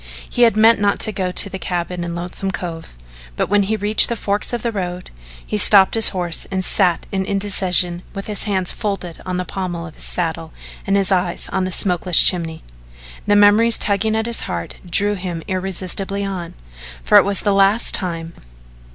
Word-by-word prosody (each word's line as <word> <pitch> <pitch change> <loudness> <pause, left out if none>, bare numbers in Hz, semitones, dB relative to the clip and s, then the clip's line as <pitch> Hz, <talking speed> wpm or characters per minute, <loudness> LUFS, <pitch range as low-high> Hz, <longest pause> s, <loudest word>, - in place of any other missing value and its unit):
He 245 - -3
had 230 -3 +4
meant 225 0 +5
not 205 0 +1
to 215 - -1
go 185 -3 -3
to 190 - +6
the 190 -1 -8
cabin 175 0 -4
in 170 0 -5
Lonesome 180 +3 -5
Cove, 170 - -7 0.4
but - - -2
when 205 +1 +3
he 205 +3 -1
reached 210 +1 +4
the 235 - -2
forks 205 -1 -2
of 240 -2 -4
the 235 - -1
road, 180 -3 -6 0.3
he 210 - -1
stopped 195 -2 +6
his 225 -1 +6
horse 175 -3 -4
and 190 -1 -3
sat 180 -4 0
in 190 -1 -2
indecision 185 -3 +1
with 195 - -6
his 210 -2 -2
hands 190 -4 -1
folded 195 -6 -5
on 180 0 -3
the 180 - -3
pommel 180 -3 -5
of 160 - -11
his - - -4
saddle 165 -2 -3 0.3
and 195 +1 +2
his 195 0 +2
eyes 180 -2 0
on 190 -1 -2
the 185 - -4
smokeless 180 -2 +2
chimney. 165 -3 +2 0.6
The 205 - +3
memories 210 +3 +5
tugging 210 +2 0
at 220 0 -1
his 235 0 +1
heart 85 -1 -6
drew 205 +4 +2
him 180 -4 -6
irresistibly 190 +1 -3
on, 185 -4 -6 0.5
for - - +6
it - - +3
was 200 0 -1
the 205 - 0
last 195 +3 +2
time. 170 -3 -3
190 Hz, 195 wpm, -18 LUFS, 175-205 Hz, 0.6 s, to